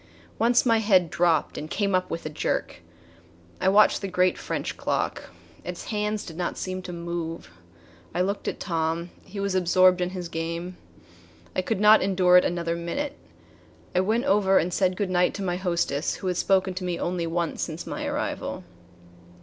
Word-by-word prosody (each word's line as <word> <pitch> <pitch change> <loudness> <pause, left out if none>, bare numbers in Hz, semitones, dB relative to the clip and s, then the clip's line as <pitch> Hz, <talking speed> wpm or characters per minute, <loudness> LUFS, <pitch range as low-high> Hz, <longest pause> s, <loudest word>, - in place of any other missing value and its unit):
Once 240 +2 +4
my 230 -2 +4
head 190 -6 +3
dropped 170 -2 +1
and 155 - -7
came 200 +1 0
up 185 0 +1
with 165 - -5
a - - -2
jerk. 150 - -2 0.8
I 190 - +3
watched 210 +2 +5
the 195 - -3
great 180 -1 +2
French - - -4
clock. - - -2 0.4
Its 180 0 -6
hands 210 0 -1
did 165 - -9
not 175 -1 -2
seem 185 0 -4
to 180 - -7
move. 170 - -5 0.6
I 180 - -1
looked 200 +2 -2
at - - -3
Tom. 165 0 -2
He 200 +1 -8
was 200 -1 -1
absorbed 185 0 +4
in 180 - 0
his 180 -2 -5
game. 170 +2 -4 0.8
I - - +2
could 190 +2 -2
not 210 +1 +7
endure 185 -2 +3
it 180 - +7
another 170 -1 -1
minute. 275 +13 -3 0.8
I 180 - +2
went 220 +7 +1
over 200 -7 +4
and 175 +2 +1
said 185 0 +1
good 200 -3 -1
night 180 0 +2
to 200 - -4
my 180 -1 -1
hostess 170 -5 -1
who - - -9
had 180 -1 0
spoken 190 0 +2
to 185 0 -5
me 175 -1 -2
only 175 -1 -2
once 170 0 -2
since 160 0 -4
my - - -5
arrival. - - -3
180 Hz, 185 wpm, -26 LUFS, 170-195 Hz, 0.8 s, not